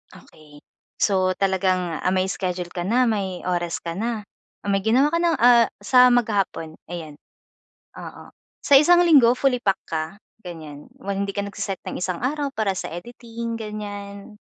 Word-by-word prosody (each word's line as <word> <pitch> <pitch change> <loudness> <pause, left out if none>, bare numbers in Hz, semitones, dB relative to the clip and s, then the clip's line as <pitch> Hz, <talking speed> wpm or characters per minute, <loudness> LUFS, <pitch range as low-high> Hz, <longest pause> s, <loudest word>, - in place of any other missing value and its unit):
Okey. 150 -1 -17 0.4
So, 185 -2 +2
talagang, 185 -3 0
ah, - - +1
may 185 0 +1
schedule 180 -2 -3
ka 175 - -3
na, 245 +7 +2
may 195 -5 -2
oras 175 -2 -1
ka 170 -1 -5
na. 220 +2 -3 0.4
May 195 -1 +1
ginawa 260 +8 +3
ka 335 - +2
na, 345 - +3
ah, 235 -1 +6
sa 250 +5 +5
maghapon, 205 -9 0 0.2
ayan. 165 -4 -7 0.9
Oo. - - -10 0.3
Sa - - +2
isang 350 +4 +5
linggo 275 -8 +6
fully 265 -3 +1
pack 195 -3 +1
ka, 155 -1 -2 0.4
ganyan? 155 -5 -10 0.2
Hindi 200 0 -2
ka 200 - -1
nag-se-set 200 -2 -5
ng - - -5
isang 180 +1 -3
araw 285 +2 -1
para 215 -3 0
sa 185 - -5
editing, 230 +5 -7
ganyan? 205 -1 -7
200 Hz, 155 wpm, -23 LUFS, 180-235 Hz, 0.9 s, ah